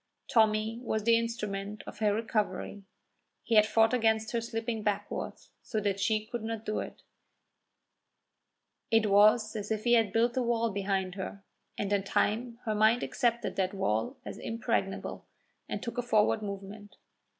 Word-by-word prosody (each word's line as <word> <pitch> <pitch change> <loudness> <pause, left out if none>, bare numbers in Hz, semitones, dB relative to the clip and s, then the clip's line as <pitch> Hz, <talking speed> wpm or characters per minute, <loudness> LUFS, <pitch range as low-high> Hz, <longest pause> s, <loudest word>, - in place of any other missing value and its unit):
Tommy 220 0 +2
was 220 -3 -2
the 230 +1 +5
instrument 210 -3 -3
of - - -9
her 210 -1 +3
recovery. 215 -1 -2 0.6
He 235 - -2
had 215 -1 +6
fought 225 +2 +3
against 220 -2 +2
her 235 - 0
slipping 225 -1 -3
backward 205 -1 -2 0.3
so 220 - -3
that 200 -2 -1
she 215 +1 +1
could 235 +1 -5
not 225 -1 -4
do 215 - -1
it; - - -7 1.9
it 220 -2 +3
was 215 +2 +5
as 210 -1 -4
if 215 -1 -1
he 240 - +3
had 225 -3 +4
built 235 +1 +2
a 260 - +1
wall 230 -1 +1
behind 195 -2 -1
her, 195 +1 -6 0.3
and 205 0 -1
in 200 -1 +2
time 230 +4 0
her 215 - 0
mind 220 +3 +4
accepted 235 -2 -1
that 190 0 0
wall 110 - -1
as - - -7
impregnable 225 -4 -2 0.4
and - - -4
took 235 0 -4
a - - +2
forward 215 -2 +2
movement. 200 +1 -7
215 Hz, 160 wpm, -30 LUFS, 205-230 Hz, 1.9 s, had